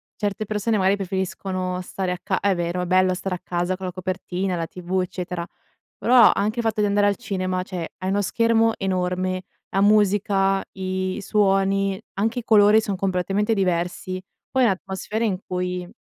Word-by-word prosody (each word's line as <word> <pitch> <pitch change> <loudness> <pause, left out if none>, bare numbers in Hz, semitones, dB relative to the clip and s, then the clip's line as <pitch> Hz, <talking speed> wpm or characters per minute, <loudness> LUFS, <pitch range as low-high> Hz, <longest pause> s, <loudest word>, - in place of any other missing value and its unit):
certe 205 0 -2
persone 215 +1 0
magari 190 0 +3
preferiscono 190 -1 -3
stare 185 0 -3
a 180 - -2
ca 195 -3 0
è 200 -1 +2
vero, 175 +1 -2
è - - -2
bello 185 +1 +3
stare 185 +1 -3
a - - -8
casa 175 +1 -1
con 190 - -6
la - - -3
copertina, 185 0 -3
la 165 -1 -2
TV, 180 +2 -2
eccetera, 180 -1 -4 0.5
però 245 0 +6
anche 210 +4 -1
il - - -4
fatto 220 -1 0
di 210 - +3
andare 205 0 +3
al 200 - +1
cinema, 185 -5 -2
cioè 180 -3 -6
hai 185 - -3
uno 200 +1 +1
schermo 225 +2 +2
enorme, 185 -1 -1 0.3
la 195 - +1
musica, 200 -1 +3
i 185 0 -3
suoni, 195 -1 +2
anche 220 +5 0
i - - -13
colori 215 -1 +6
son 205 -4 -3
completamente 195 +3 0
diversi, 185 -1 -1 0.3
poi 260 -2 +3
atmosfere 195 +2 -2
in 195 -5 0
cui 180 -1 -3
190 Hz, 175 wpm, -23 LUFS, 185-205 Hz, 0.5 s, però